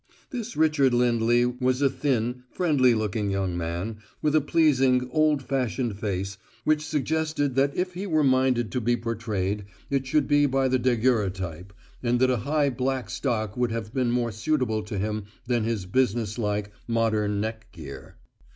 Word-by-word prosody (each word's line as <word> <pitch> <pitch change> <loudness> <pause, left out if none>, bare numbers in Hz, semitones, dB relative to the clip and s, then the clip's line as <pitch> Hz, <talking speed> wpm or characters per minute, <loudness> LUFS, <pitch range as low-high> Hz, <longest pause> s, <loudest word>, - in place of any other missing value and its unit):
This 240 -3 -5
Richard 150 -5 +3
Lindley 120 0 +3
was 125 +1 0
a 140 - +4
thin, 125 -3 -1
friendly 135 -9 +3
looking 105 -1 -1
young 95 -2 -1
man 85 +6 -3 0.2
with 150 -1 +1
a 155 - +5
pleasing, 135 -5 +3
old 155 -1 +2
fashioned 125 -5 -1
face 95 -2 -3 0.2
which 155 0 +2
suggested 155 -1 -1
that 140 +2 +1
if 180 0 -1
he 190 +3 -4
were 155 -4 +2
minded 130 -4 +2
to 125 - -1
be 120 +2 +1
portrayed 105 -4 -2 0.3
it 135 -1 0
should 145 +1 +2
be 145 -1 +4
by 135 0 +1
the 130 0 +2
daguerreotype, 100 -8 0 0.3
and 120 0 +1
that 130 0 +4
a 125 - +1
high, 145 +5 +1
black 130 0 -2
stock 110 -6 -2
would 125 -2 0
have 110 -1 -4
been 130 -3 +1
more 120 -1 0
suitable 110 -1 0
to 105 -1 -5
him 105 +1 -2 0.2
than 120 -3 0
his 110 -5 -2
businesslike, 105 -2 0 0.2
modern 110 -3 +1
neck 110 +1 -4
gear. 70 -6 -10
120 Hz, 165 wpm, -26 LUFS, 110-135 Hz, 0.3 s, a